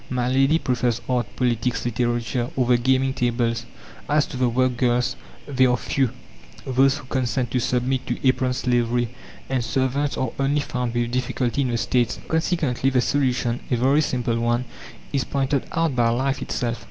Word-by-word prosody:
My 125 -1 -1
lady 135 +4 +3
prefers 125 -5 0
art, 125 -2 0
politics, 120 -1 0
literature, 120 +1 -1
or 130 - +2
the 120 0 +3
gaming 130 +1 +2
tables; 120 -2 0 0.4
as 150 0 +3
to - - -9
the 125 -1 +2
work 130 +1 +1
girls, 125 0 +1 0.3
they 130 -2 +3
are 125 0 +2
few, 135 +2 0 0.6
those 135 +2 +3
who 145 - -10
consent 125 -2 -1
to 125 - +1
submit 125 +2 0
to - - -1
apron 130 0 +2
slavery, 120 -1 +1 0.4
and 130 -2 0
servants 135 +4 0
are 130 -3 -1
only 140 +2 +2
found 125 -3 -3
with 120 0 0
difficulty 125 +1 -1
in 135 - +1
the 120 - 0
States. 120 +1 +1
Consequently, 160 -6 +1
the 130 -1 +2
solution, 125 -2 +1
a 125 - +2
very 135 +5 +3
simple 120 -5 -1
one, 120 +1 +1 0.5
is 135 -2 +1
pointed 135 +1 -1
out 165 -5 0
by 120 -2 +3
life 130 +3 0
itself. 120 -1 -2
125 Hz, 175 wpm, -23 LUFS, 120-135 Hz, 0.6 s, lady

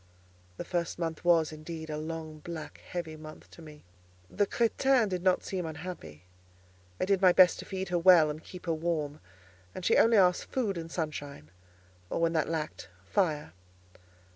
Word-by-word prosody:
The - - -5
first 170 -2 -2
month 165 -2 -3
was, 165 -3 +4
indeed, 160 +1 -7
a 150 - -3
long, 155 -1 -6
black, 155 -2 -8
heavy 170 -3 -6
month 155 0 -12
to - - -13
me. 150 -2 -13 0.5
The 205 -1 +1
crétin 240 0 +2
did 180 -2 -2
not 185 0 +2
seem 185 -2 -3
unhappy. 160 - -8 0.8
I - - +1
did 195 0 +2
my 185 -2 +7
best 180 0 +6
to - - -7
feed 190 -1 -4
her 175 -1 +1
well 170 -3 +6
and 155 +2 -9
keep 180 -1 -11
her 165 - 0
warm, 155 -3 -2 0.6
and 185 - -6
she - - +4
only 230 0 +5
asked 180 -2 +4
food 225 -7 -1
and 165 -1 -6
sunshine, 145 - -5 0.6
or - - -2
when 165 0 +2
that 160 -1 +1
lacked, 155 - -4 0.2
fire. 150 - 0
165 Hz, 175 wpm, -30 LUFS, 155-185 Hz, 0.8 s, my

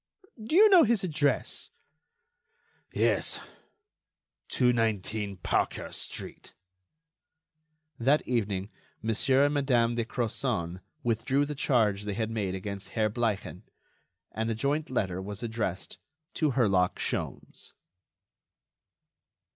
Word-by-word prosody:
"Do 265 +9 -1
you 425 +4 +9
know 380 -4 +8
his 230 -6 +3
address?" 150 -5 0 1.2
"Yes; - - +1 1.1
219 110 -4 +1
Parker 90 - -1
street." - - -6 1.4
That 135 +6 +2
evening 105 -4 -1 0.3
Monsieur 130 +5 +3
and 145 - +1
Madame 125 -5 +2
de 120 0 0
Crozon 110 -7 -2 0.2
withdrew 125 +5 +1
the 150 - -4
charge 110 -8 +1
they 105 -1 -3
had 110 0 -2
made 100 -4 -2
against 100 +1 -6
Herr 110 -1 +2
Bleichen, 110 -3 -2 0.7
and 110 +1 -2
a 115 - 0
joint 145 +6 -1
letter 95 -7 -1
was 100 +3 -7
addressed 110 -5 -3 0.3
to 150 -4 +1
Herlock 100 -8 +2
Sholmes. - - -4
115 Hz, 105 wpm, -29 LUFS, 105-135 Hz, 1.4 s, you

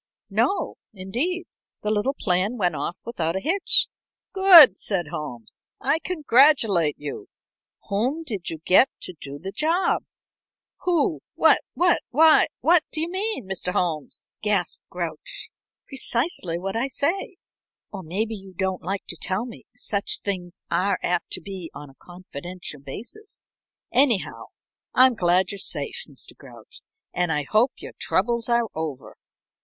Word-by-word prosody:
"No, 395 - 0 0.2
indeed. 260 - -2 0.4
The 210 - 0
little 220 +6 0
plan 190 +5 +1
when 180 -5 +2
off 170 +3 -3
without 170 -8 -2
a - - 0
hitch." 360 - +2 0.5
"Good," 355 - +9
said 175 -7 -1
Holmes. 145 -9 -6 0.2
"I 315 - +2
congratulate 260 - +3
you. 145 -1 -7 0.6
Whom 255 +11 0
did 205 - -4
you 165 - -5
get 220 +9 +6
to 185 - -7
do 140 0 -7
the 190 +6 -6
job?" 330 - +1 0.8
"Who 335 -2 +1
what - - +5
what 350 -1 +3
why, 315 +3 +6
what 340 -1 +5
do - - -2
you 330 +2 -1
mean, 400 - -2
Mr. 180 -1 -3
Holmes?" 160 -5 -2 0.2
gasped 205 -5 0
Grouch. 170 -3 -5 0.4
"Precisely 240 - -1
what 195 +3 -4
I 235 +4 0
say 350 - -2 0.5
or 195 - -6
maybe 200 +7 -2
you 195 -3 -10
don't 190 0 -1
like 190 +3 -3
to 175 - -5
tell 190 +5 -1
me 240 - -11
such 200 -1 -1
things 180 -3 -4
are 195 +1 +2
apt 175 -1 0
to 185 - +4
be 185 -2 -7
on 145 0 -9
a - - -24
confidential 175 -2 -9
basis. 245 - -8 0.5
Anyhow, 250 -5 +2 0.5
I'm 255 0 +7
glad 180 -2 +2
you're 200 - -6
safe, - - -2
Mr. - - -9
Grouch, - - -13 0.3
and 175 -2 0
I 150 -1 0
hope 220 - +2
your - - -10
troubles 235 -1 0
are 235 0 +3
over." 155 -4 -5
200 Hz, 145 wpm, -24 LUFS, 175-280 Hz, 0.8 s, Good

